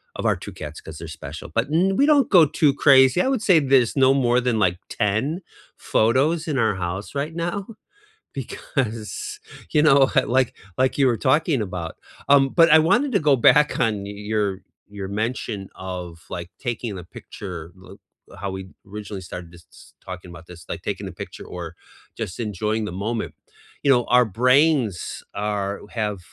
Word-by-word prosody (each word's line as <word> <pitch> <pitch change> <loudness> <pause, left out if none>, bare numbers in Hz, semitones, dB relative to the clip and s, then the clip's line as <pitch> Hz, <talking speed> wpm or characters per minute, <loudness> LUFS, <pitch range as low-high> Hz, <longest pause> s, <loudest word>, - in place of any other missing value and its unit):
of - - -5
our - - +3
2 - - -8
cats 75 +1 -8
'cause 80 -1 -10
they're 85 - -8
special, 75 +2 -8
but 115 +3 0
n 190 +4 +2
we 280 - +5
don't 290 -4 +4
go 175 -5 +7
too 150 -1 +2
crazy, 135 +3 +5
I - - +1
would 265 -5 0
say 185 -6 +5
there's 135 -4 +3
no 135 -1 +5
more 125 -2 +2
than, 120 -3 0
like, 90 -3 +1
10 115 - -1 0.4
photos 145 +9 +1
in 150 -3 -1
our 110 -4 +2
house 95 +6 -5
right 145 +3 -2
now 170 +3 -2 0.8
because, 135 - -4 0.3
you 150 - +3
know, 135 -3 +5
uh, - - -6
like 130 0 +1 0.2
like 130 +2 +1
you 140 - +4
were 120 - +1
talking 145 +1 +2
about. 90 -5 -5 0.3
Um, 140 -1 +5
but 165 +2 +5
I 160 - +8
wanted 245 - +2
to 200 - +3
go 150 -2 +4
back 150 +5 +4
on 105 -4 +1
y 100 - -7 0.2
your 100 -3 0 0.3
your 100 -2 -5
mention 105 -2 -3
of, 90 -3 -7
like, 85 -1 -6
taking 120 -4 -4
the 90 - -8
picture, 85 -1 -9
th 95 +1 -13 0.4
how 100 - -3
we 95 - -6 0.3
originally 105 -1 -6
started 85 -1 -9
s 85 - -18
talking 90 -1 -7
about 85 -1 -12
this, 90 -1 -12
like, - - -5
taking - - -4
the - - -7
picture - - -9
or 90 -1 -7 0.6
just 105 0 -5
enjoying 105 0 -2
the 90 - -5
moment. 115 -1 -2 0.5
You 140 - +4
know, 120 -2 +3
our 125 - +6 0.2
brains 130 - +2
are 100 -1 -2 0.2
have 105 -2 -1
115 Hz, 180 wpm, -23 LUFS, 95-145 Hz, 0.8 s, I